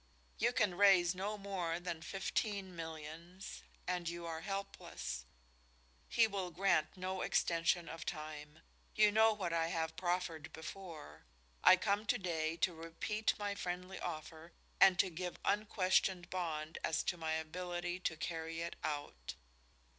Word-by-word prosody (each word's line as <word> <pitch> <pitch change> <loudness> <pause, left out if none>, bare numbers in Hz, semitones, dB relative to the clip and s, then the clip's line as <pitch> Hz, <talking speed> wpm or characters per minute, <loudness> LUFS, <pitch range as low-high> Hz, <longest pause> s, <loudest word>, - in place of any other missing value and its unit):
You 235 +3 +4
can 210 -7 +2
raise 185 -2 +6
no 200 +3 -2
more 185 -4 -2
than 175 -2 -4
fifteen 195 +1 -2
millions 165 +3 -7 0.3
and 180 -2 0
you 170 0 -5
are 165 -1 -4
helpless. 195 - -4 0.8
He 230 - +5
will 195 -4 -2
grant 175 -1 +2
no 185 0 -2
extension 170 +1 +2
of 165 +1 -6
time. 155 -1 -6 0.3
You 210 -1 +6
know 220 +1 +6
what 190 -5 -2
I 165 -1 +2
have 160 -1 -1
proffered 175 -3 -1
before. 160 - -8 0.4
I - - +10
come 205 +3 0
to - - +3
day 165 -4 -1
to 180 - +3
repeat 165 +7 -1
my 205 -1 -1
friendly 180 -1 -4
offer 160 0 -6 0.3
and 190 -2 +8
to 185 0 +3
give 180 +2 -4
unquestioned 190 -3 +2
bond 160 -3 -2
as 160 0 +1
to - - 0
my 160 -2 -2
ability 175 +2 -3
to 165 -3 -1
carry 165 0 -3
it 170 0 -4
out. 145 - -4
175 Hz, 145 wpm, -36 LUFS, 160-190 Hz, 0.8 s, I